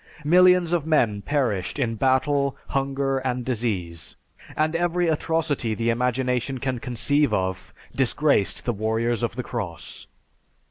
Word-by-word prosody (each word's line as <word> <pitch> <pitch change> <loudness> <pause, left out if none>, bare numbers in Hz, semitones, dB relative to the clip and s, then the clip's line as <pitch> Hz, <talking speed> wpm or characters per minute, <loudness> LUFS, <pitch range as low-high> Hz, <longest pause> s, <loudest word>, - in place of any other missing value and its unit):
Millions 180 +1 +5
of 170 -4 +1
men 120 -10 +1
perished 120 -9 -1
in 120 -5 0
battle, 135 +3 +1
hunger, 135 0 0
and 125 -2 -3
disease, 105 -9 -3 0.4
and 155 +1 +1
every 175 +1 +1
atrocity 155 -7 0
the 115 +1 0
imagination 125 +2 -1
can 130 -1 -2
conceive 125 +4 +1
of 95 -2 -2 0.2
disgraced 135 -3 +1
the 120 - 0
warriors 110 +2 -1
of 120 -2 -2
the 125 - -3
cross. 100 -11 -6
130 Hz, 130 wpm, -24 LUFS, 115-145 Hz, 0.4 s, Millions